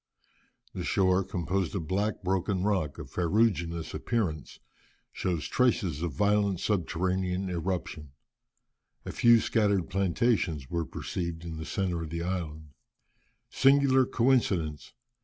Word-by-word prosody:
The 90 - -4
shore, 95 +1 +2
composed 95 0 -2
of 85 -5 -3
black 100 +4 -1
broken 95 0 0
rock 95 -8 0
of - - -9
ferruginous 85 -3 0
appearance, 90 - -2 0.5
shows 85 -5 -2
traces 95 - +1
of 85 -2 -1
violent 100 -1 +1
subterranean 95 0 -1
eruption. 85 -3 -3 1.0
A - - -4
few 120 -1 +5
scattered 100 -6 +1
plantations 95 - 0
were 85 -1 -1
perceived 85 -1 -5
in 80 -1 -6
the 80 - -6
centre 90 -3 -2
of 80 - -5
the 85 +1 -3
island. 80 -4 -4 0.8
Singular 135 -1 +4
coincidence! 100 - +1
90 Hz, 120 wpm, -29 LUFS, 85-100 Hz, 1.0 s, few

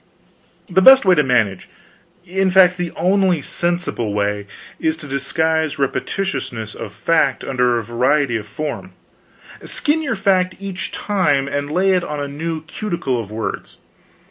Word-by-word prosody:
The 190 0 +2
best 265 +3 +8
way 185 - +6
to 155 - +4
manage 115 -8 0 0.6
in 190 +1 0
fact, 185 -1 +5
the 175 -1 -2
only 185 0 +2
sensible 170 - -2
way 100 0 -1 0.3
is 160 0 0
to 155 -3 -9
disguise 155 +3 0
repetitiousness 135 - -3
of 100 - -7
fact 135 +5 +1
under 125 -2 +1
variety 125 +3 +1
of 105 -2 -4
form: 150 +8 -5 0.7
skin 300 +2 0
your 290 - -1
fact 190 -2 +1
each 195 -1 -6
time 150 -10 0
and 145 +1 -3
lay 185 +4 +2
on 150 -4 -5
a 145 - -3
new 160 +2 -4
cuticle 160 - -3
of 110 -4 -6
words. 110 +1 -5
155 Hz, 145 wpm, -19 LUFS, 125-185 Hz, 0.7 s, best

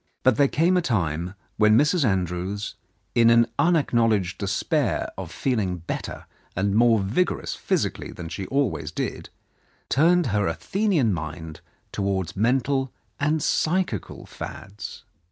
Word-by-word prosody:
But 130 -3 +5
the 140 - +5
time 175 +6 +2
came 90 - -1 0.2
when 105 0 +5
Mrs. 150 +5 +3
Andrews, 95 -1 -1 0.4
in 115 -1 +5
an 115 0 +6
un 170 +1 +4
acknowledged 115 - +1
despair 100 -1 0
of - - -7
feeling 105 -9 -1
better 85 - -6 0.3
and 100 +2 0
more 115 +1 +5
vigorous 110 - 0
physically - - -2
than 85 -2 -7
she 95 +3 -5
always 125 - -1
did, - - -4 0.6
turned 170 +5 +4
her 105 -2 +2
Athenian 155 - +1
mind 80 -1 -6 0.3
towards 95 -2 -2
mental 130 +4 +1 0.3
and 150 +1 +1
psychical 160 - -1
fads. 100 +3 -8
110 Hz, 125 wpm, -24 LUFS, 95-140 Hz, 0.6 s, an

